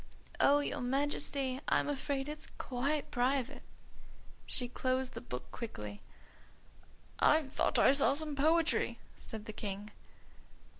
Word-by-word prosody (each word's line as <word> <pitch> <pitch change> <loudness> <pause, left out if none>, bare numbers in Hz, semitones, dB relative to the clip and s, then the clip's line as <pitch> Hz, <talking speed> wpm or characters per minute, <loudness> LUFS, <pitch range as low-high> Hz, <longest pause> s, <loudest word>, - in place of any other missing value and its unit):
"Oh, 290 +1 +5
your 285 -1 -3
Majesty! 270 0 0
I'm - - +2
afraid 280 -1 -2
it's 300 0 -5
quite 275 +4 -2
private." 260 +2 0 0.9
She 250 - +1
closed 255 +1 -1
the - - -6
book 125 - -7
quickly. 105 - -6 1.2
"I 310 +1 +5
just 270 0 -13
thought - - +1
I - - +7
saw 275 0 +5
some 305 -1 0
poetry," 320 +3 +2 0.2
said 220 -1 -8
the 215 - -6
King. 205 0 -5
270 Hz, 130 wpm, -34 LUFS, 245-290 Hz, 1.2 s, I